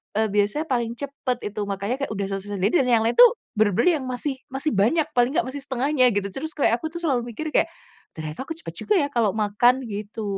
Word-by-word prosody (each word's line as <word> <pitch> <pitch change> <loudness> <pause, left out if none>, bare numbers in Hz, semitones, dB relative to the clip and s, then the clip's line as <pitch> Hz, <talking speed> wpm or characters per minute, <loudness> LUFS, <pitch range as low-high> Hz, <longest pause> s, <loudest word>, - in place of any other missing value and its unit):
eee, 220 +1 +2
biasanya 210 +9 +1
paling 235 -2 0
cepet, 275 -1 -3
itu. 210 - -7
Makannya 200 +4 -2
kayak 280 -5 -3
udah 200 -1 -2
selesai 195 +1 -4
sendiri. 200 - +2
Dan 260 - +1
yang 230 -3 +4
lain 225 - +2
tuh, - - +9 0.2
bener-bener 220 - +3
yang 260 - -6
masih 260 +2 -3
masih 270 +3 -2
banyak. 230 +11 +3
Paling 245 +3 +2
enggak - - +3
masih 285 - -5
setengahnya, 265 0 +2
gitu. 200 -1 0
Terus, 310 +8 -5
kayak 245 -5 +2
aku 315 - -3
tuh 340 - -4
selalu 255 -7 0
mikir, 310 +4 -4
kayak, - - +3 0.5
"Ternyata 155 - -6
aku 325 - -4
cepet 330 - -8
juga, 425 - +4
ya, 285 -6 +1
kalau 225 -6 +1
makan," 235 +5 +2
gitu. 215 -1 -6
245 Hz, 225 wpm, -24 LUFS, 210-285 Hz, 0.5 s, tuh